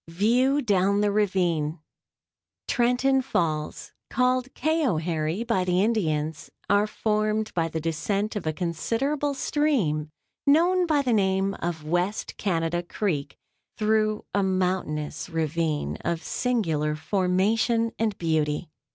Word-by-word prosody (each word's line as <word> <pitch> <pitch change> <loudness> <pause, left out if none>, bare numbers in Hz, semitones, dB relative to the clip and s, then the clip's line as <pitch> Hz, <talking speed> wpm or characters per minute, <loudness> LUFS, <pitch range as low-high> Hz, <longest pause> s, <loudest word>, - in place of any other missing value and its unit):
(VIEW 240 - +2
DOWN 200 -2 +2
THE 205 -1 +2
RAVINE.) 180 -6 +1 0.9
Trenton 250 +2 +2
Falls 155 -11 -2 0.2
(called 255 0 +1
Cayoharie 175 - 0
by 230 -6 +1
the 180 +1 +2
Indians) 155 -8 -1 0.2
are 205 +1 +3
formed 215 0 -1
by 165 -2 +1
the 160 0 -3
descent 195 +7 -1
of 200 -6 -3
a - - +2
considerable 235 - -1
stream, 230 - 0 0.4
known 350 +5 +4
by 295 -3 +2
the 250 -3 +1
name 195 -1 +2
of 170 -2 -3
West 175 +6 -1
Canada 170 -2 0
Creek, 175 -6 -3 0.4
through 215 0 +1
a 200 - +2
mountainous 180 -5 -1
ravine 160 -1 -1
of 170 -1 -3
singular 160 -12 0
formation 205 +7 +1
and 220 -3 0
beauty. 160 -1 -1
190 Hz, 115 wpm, -26 LUFS, 165-230 Hz, 0.9 s, known